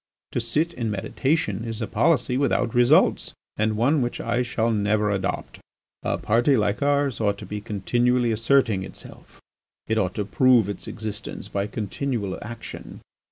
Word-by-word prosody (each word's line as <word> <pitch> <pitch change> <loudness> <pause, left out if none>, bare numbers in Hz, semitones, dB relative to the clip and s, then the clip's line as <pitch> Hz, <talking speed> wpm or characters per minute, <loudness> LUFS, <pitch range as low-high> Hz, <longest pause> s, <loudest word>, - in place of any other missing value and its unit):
To - - -1
sit 150 +9 -1
in 115 -8 -3
meditation 105 - -1
is 115 -1 -5
a 115 - -1
policy 130 -1 +2
without 125 -3 +1
results 120 0 +4 0.2
and 110 0 0
one 135 +6 +3
which 120 0 -2
I 120 +1 0
shall 115 -1 0
never 105 0 +1
adopt. 95 -1 -3 0.4
"A - - -1
party 120 +5 +2
like 105 +2 0
ours 140 -3 +1
ought 100 -2 +1
to - - -9
be 105 0 -5
continually 120 +4 +1
asserting 115 -2 +2
itself. 95 - -12 0.5
It 110 0 0
ought 90 -2 -1
to 105 - -2
prove 120 0 +4
its 100 - -6
existence 110 -1 -6
by 100 0 -2
continual 110 -1 -3
action. 115 +2 -9
115 Hz, 160 wpm, -24 LUFS, 105-125 Hz, 0.5 s, results